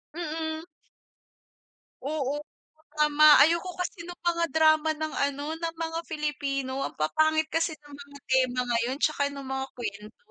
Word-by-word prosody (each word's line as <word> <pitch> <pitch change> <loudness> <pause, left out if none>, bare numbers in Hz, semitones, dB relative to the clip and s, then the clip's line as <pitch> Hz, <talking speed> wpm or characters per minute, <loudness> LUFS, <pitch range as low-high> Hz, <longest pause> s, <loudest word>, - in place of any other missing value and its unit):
Mm. 320 -1 -4 1.4
Oo, 285 0 -2 0.6
tama 300 0 +5 0.2
ayoko 340 +3 +1
kasi 360 -1 -5
nung 355 0 -10
mga 340 -1 +1
drama 315 0 +4
ng 310 0 -4 0.2
ano, 285 +1 -6
ng 330 0 -3
mga 325 0 -3
Filipino 280 -4 -2
ang - - -14
papangit 315 - +1
kasi 325 0 0
ng 290 -1 -19
mga 285 0 -11
tema 255 -1 +3
ngayon 240 +2 0
tsaka 285 -2 +2
nung 275 -1 -8
mga 265 0 -2
kwento. 215 - -7
300 Hz, 140 wpm, -27 LUFS, 275-320 Hz, 1.4 s, tama